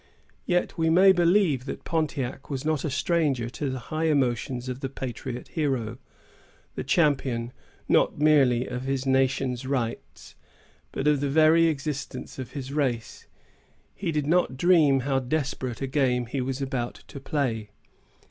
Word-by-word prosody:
Yet 175 Hz, 0 st, 0 dB
we 160 Hz, 0 st, +2 dB
may 185 Hz, +4 st, +7 dB
believe 175 Hz, -, +3 dB
that -, -, -6 dB
Pontiac 145 Hz, -6 st, -2 dB
was 135 Hz, 0 st, -4 dB
not 155 Hz, -3 st, 0 dB
a 155 Hz, -, -1 dB
stranger 140 Hz, -5 st, 0 dB
to 145 Hz, +2 st, -3 dB
the 130 Hz, -, -3 dB, 0.2 s
high 160 Hz, +1 st, 0 dB
emotion 130 Hz, -4 st, +1 dB
of 125 Hz, 0 st, -4 dB
the 135 Hz, -1 st, -4 dB
patriot 130 Hz, -1 st, -6 dB
hero, 130 Hz, -7 st, -2 dB, 0.7 s
the -, -, -4 dB
champion 130 Hz, -7 st, +1 dB, 0.3 s
not -, -, +3 dB
merely 135 Hz, -5 st, +4 dB
of 125 Hz, 0 st, -5 dB
his 135 Hz, 0 st, -2 dB
nation's 130 Hz, -1 st, +1 dB
rights, 125 Hz, -4 st, -4 dB, 0.6 s
but 135 Hz, -, -4 dB
of 150 Hz, -2 st, +4 dB
the 140 Hz, 0 st, -1 dB
very 160 Hz, +3 st, +5 dB
existence 145 Hz, -3 st, -4 dB
of 130 Hz, -, -7 dB
his 135 Hz, -1 st, -6 dB
race. 130 Hz, -6 st, -2 dB, 0.7 s
He 185 Hz, -4 st, -3 dB
did 150 Hz, -2 st, -1 dB
not 155 Hz, -5 st, +1 dB
dream 155 Hz, -5 st, +4 dB
how 135 Hz, +1 st, 0 dB
desperate 130 Hz, -2 st, -3 dB
a -, -, +1 dB
game 130 Hz, -3 st, +1 dB
he 130 Hz, +3 st, -3 dB
was 135 Hz, +2 st, -3 dB
about 125 Hz, -3 st, -4 dB
to 140 Hz, -, -8 dB
play. 125 Hz, -7 st, -2 dB
135 Hz, 155 wpm, -26 LUFS, 130-155 Hz, 0.7 s, may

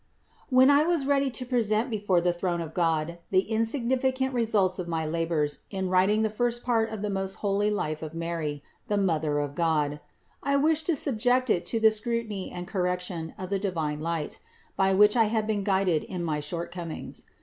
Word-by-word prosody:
When 260 Hz, +1 st, +6 dB
I 285 Hz, +1 st, +5 dB
was 325 Hz, -3 st, +1 dB
ready 280 Hz, -1 st, +2 dB
to 255 Hz, 0 st, -4 dB
present 235 Hz, -2 st, +1 dB
before 200 Hz, -5 st, +1 dB
the 175 Hz, 0 st, +1 dB
throne 175 Hz, 0 st, -2 dB
of 160 Hz, -1 st, -5 dB
God 165 Hz, -1 st, 0 dB
the 185 Hz, -1 st, +4 dB
insignificant 260 Hz, +4 st, 0 dB
results 210 Hz, -6 st, +1 dB
of 180 Hz, -, -4 dB
my 165 Hz, -2 st, -2 dB
labors 155 Hz, -2 st, -1 dB
in 190 Hz, -2 st, -3 dB
writing 195 Hz, +4 st, +3 dB
the 220 Hz, -, +1 dB
first 240 Hz, +2 st, -1 dB
part 225 Hz, -2 st, +1 dB
of 220 Hz, -2 st, -6 dB
the 210 Hz, -, -1 dB
most 195 Hz, 0 st, -2 dB
holy 205 Hz, +1 st, +2 dB
life 155 Hz, -7 st, -2 dB
of 160 Hz, 0 st, -7 dB
Mary, 165 Hz, -4 st, -3 dB, 0.2 s
the 210 Hz, -3 st, 0 dB
Mother 160 Hz, -6 st, +1 dB
of 145 Hz, -1 st, -2 dB
God, 150 Hz, -3 st, 0 dB, 0.4 s
I 280 Hz, 0 st, +1 dB
wished 310 Hz, +2 st, +2 dB
to 340 Hz, -, +2 dB
subject 255 Hz, -2 st, +2 dB
it 170 Hz, -, 0 dB
to 230 Hz, -, 0 dB
the 220 Hz, 0 st, +6 dB
scrutiny 220 Hz, -2 st, -3 dB
and 175 Hz, 0 st, -7 dB
correction 180 Hz, -3 st, -2 dB
of 185 Hz, 0 st, -7 dB
the 200 Hz, -, +1 dB
divine 160 Hz, -7 st, -2 dB
light, 165 Hz, -1 st, -3 dB, 0.4 s
by 195 Hz, 0 st, +2 dB
which 210 Hz, +2 st, +6 dB
I 230 Hz, -2 st, +5 dB
had 215 Hz, 0 st, 0 dB
been 210 Hz, -2 st, -1 dB
guided 190 Hz, -5 st, +1 dB
in 180 Hz, -2 st, -5 dB
my 155 Hz, -3 st, -1 dB
shortcomings. 170 Hz, +2 st, -6 dB
195 Hz, 195 wpm, -27 LUFS, 170-230 Hz, 0.4 s, When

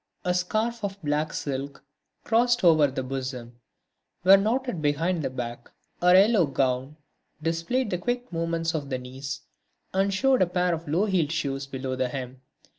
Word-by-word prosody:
A 180 Hz, -, +2 dB
scarf 215 Hz, +6 st, -1 dB
of 200 Hz, 0 st, -3 dB
black 150 Hz, +1 st, 0 dB
silk, 140 Hz, 0 st, -4 dB, 0.4 s
crossed 240 Hz, +1 st, +2 dB
over 160 Hz, -4 st, +6 dB
the 130 Hz, -1 st, -4 dB
bosom, 130 Hz, -2 st, -5 dB, 0.6 s
was 195 Hz, +2 st, +8 dB
knotted 230 Hz, -3 st, -1 dB
behind 160 Hz, +4 st, +1 dB
the 135 Hz, -, -1 dB
back. 120 Hz, -2 st, -6 dB, 0.3 s
Her 180 Hz, +1 st, +6 dB
yellow 195 Hz, -3 st, +5 dB
gown 135 Hz, +1 st, -1 dB, 0.4 s
displayed 165 Hz, +10 st, -1 dB
the 180 Hz, -, -1 dB
quick 245 Hz, 0 st, -3 dB
movements 165 Hz, 0 st, -1 dB
of 145 Hz, -4 st, -3 dB
the 130 Hz, -, -1 dB
knees 135 Hz, +2 st, -7 dB, 0.5 s
and 195 Hz, +1 st, +2 dB
showed 260 Hz, +5 st, +3 dB
a 185 Hz, -, +4 dB
pair 180 Hz, 0 st, +1 dB
of 165 Hz, 0 st, -5 dB
low 170 Hz, +8 st, +2 dB
heeled 180 Hz, -7 st, +1 dB
shoes 135 Hz, -3 st, -2 dB
below 130 Hz, -1 st, -4 dB
the 130 Hz, -1 st, -1 dB
hem. 130 Hz, 0 st, -6 dB
165 Hz, 165 wpm, -26 LUFS, 135-190 Hz, 0.6 s, was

